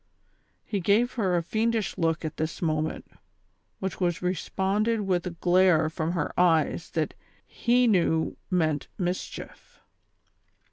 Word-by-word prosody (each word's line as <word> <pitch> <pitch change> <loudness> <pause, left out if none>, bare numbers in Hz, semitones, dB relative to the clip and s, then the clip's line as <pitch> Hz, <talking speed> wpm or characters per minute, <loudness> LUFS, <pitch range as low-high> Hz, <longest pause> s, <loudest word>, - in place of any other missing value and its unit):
He 205 - -2
gave 210 +7 +2
her 190 -7 +1
a 170 - 0
fiendish 220 +3 0
look 165 -2 0
at 155 - -5
this 160 +1 -3
moment, 155 -2 -1 0.7
which 190 0 -4
was 175 -2 +1
responded 195 +5 0
with 185 -3 0
a 170 -2 -7
glare 175 -3 +4
from 160 +1 -2
her 165 -5 -2
ej^es 165 -3 +2
that - - -1 0.5
lie 245 +1 +5
knew 170 -7 +2
meant 160 -6 0
mischief. 180 -1 -5
180 Hz, 130 wpm, -27 LUFS, 165-200 Hz, 0.7 s, lie